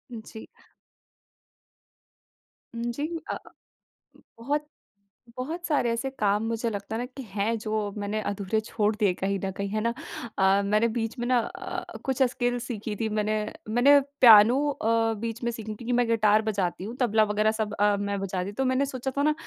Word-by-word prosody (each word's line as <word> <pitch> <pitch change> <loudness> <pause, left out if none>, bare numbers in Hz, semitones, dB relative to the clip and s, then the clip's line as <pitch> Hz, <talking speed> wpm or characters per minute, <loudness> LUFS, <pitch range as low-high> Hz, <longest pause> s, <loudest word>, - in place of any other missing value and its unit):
जी। 220 0 -10 2.3
उम, 230 - -4
जी। 285 +5 -3 0.3
अ - - -2
अ, - - -4 1.0
बहुत, 290 +5 -1 0.7
बहुत 320 +8 -4
सारे 285 -6 +2
ऐसे 230 +4 -2
काम 205 +1 +2
मुझे 230 +1 -1
लगता 205 0 -5
है 230 - -2
न - - -3
कि 270 - -5
हैं 210 +3 0
जो 215 0 -5 0.3
मैंने 205 +1 -2
अधूरे 200 +1 -1
छोड़ 210 -1 0
दिए 210 -4 +2
कहीं 195 +2 -2
न 190 - -2
कहीं, 200 0 -2
है 215 +2 -1
ना। 235 +1 0 0.4
अ, 195 +1 +4
मैंने 210 +3 +3
बीच 225 +2 -2
में 240 - -2
न 255 0 +3
अ, 230 - -5 0.2
कुछ 265 0 -1
स्किल्स 245 -1 0
सीखी 215 -3 -4
थी 220 +2 -2
मैंने, 215 0 0 0.4
मैंने 265 +6 +6 0.2
पियानो 225 0 +9
अ, 230 -4 +1
बीच 230 +1 -4
में 235 - +1
सीखी 220 -2 -6
थी - - -5
क्योंकि 240 +3 -3
मैं 245 -1 +2
गिटार 215 -2 +4
बजाती 195 -5 -1
हूँ, 225 +5 -6
तबला 220 -3 +4
वग़ैरह 215 +1 +2
सब 220 -1 -3
अ, 205 0 +3
मैं 200 0 -2
बजाती 185 -1 -3
हूँ। 205 - -10
तो 265 - 0
मैंने 260 +2 +2
सोचा 265 -1 -4
था 285 - +2
न 305 +1 +3
220 Hz, 190 wpm, -27 LUFS, 205-245 Hz, 2.3 s, पियानो